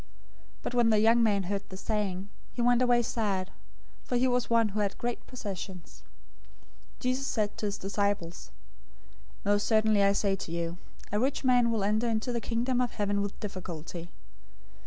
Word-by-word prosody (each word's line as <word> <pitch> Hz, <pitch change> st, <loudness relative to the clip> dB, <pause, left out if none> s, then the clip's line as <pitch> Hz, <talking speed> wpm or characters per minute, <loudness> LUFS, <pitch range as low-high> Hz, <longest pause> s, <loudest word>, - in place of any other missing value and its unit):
019:022 -, -, -30 dB
But -, -, -3 dB
when 240 Hz, -2 st, +4 dB
the 215 Hz, -, +5 dB
young 225 Hz, +3 st, +5 dB
man 205 Hz, -3 st, +3 dB
heard 200 Hz, +2 st, -2 dB
the 190 Hz, -, -8 dB
saying, 200 Hz, -2 st, -2 dB, 0.2 s
he -, -, -10 dB
went 240 Hz, +1 st, +4 dB
away 245 Hz, -1 st, +4 dB
sad, 200 Hz, -5 st, -1 dB, 0.5 s
for -, -, -2 dB
he 255 Hz, +2 st, +3 dB
was 250 Hz, -1 st, +1 dB
one 230 Hz, -2 st, +4 dB
who 210 Hz, +1 st, -3 dB
had 200 Hz, -1 st, 0 dB
great 240 Hz, 0 st, -3 dB
possessions. 190 Hz, -6 st, -7 dB, 0.9 s
019:023 -, -, -30 dB
Jesus 255 Hz, +2 st, 0 dB
said 210 Hz, -2 st, 0 dB
to 210 Hz, -, -2 dB
his 200 Hz, -, -2 dB
disciples, 200 Hz, -, -2 dB, 1.0 s
"Most 205 Hz, 0 st, +2 dB
certainly 215 Hz, -2 st, +4 dB
I 200 Hz, 0 st, +5 dB
say 200 Hz, -1 st, +1 dB
to 175 Hz, -, -7 dB
you, 170 Hz, +1 st, -3 dB, 0.3 s
a 205 Hz, -, +1 dB
rich 270 Hz, +4 st, 0 dB
man 245 Hz, -2 st, +4 dB
will 225 Hz, -3 st, 0 dB
enter 215 Hz, +4 st, +1 dB
into 225 Hz, +2 st, 0 dB
the 235 Hz, -, -1 dB
Kingdom 245 Hz, +2 st, 0 dB
of 245 Hz, -, -1 dB
Heaven 205 Hz, -1 st, 0 dB
with 200 Hz, 0 st, -4 dB
difficulty. 175 Hz, -3 st, -6 dB
210 Hz, 180 wpm, -29 LUFS, 195-235 Hz, 1.0 s, the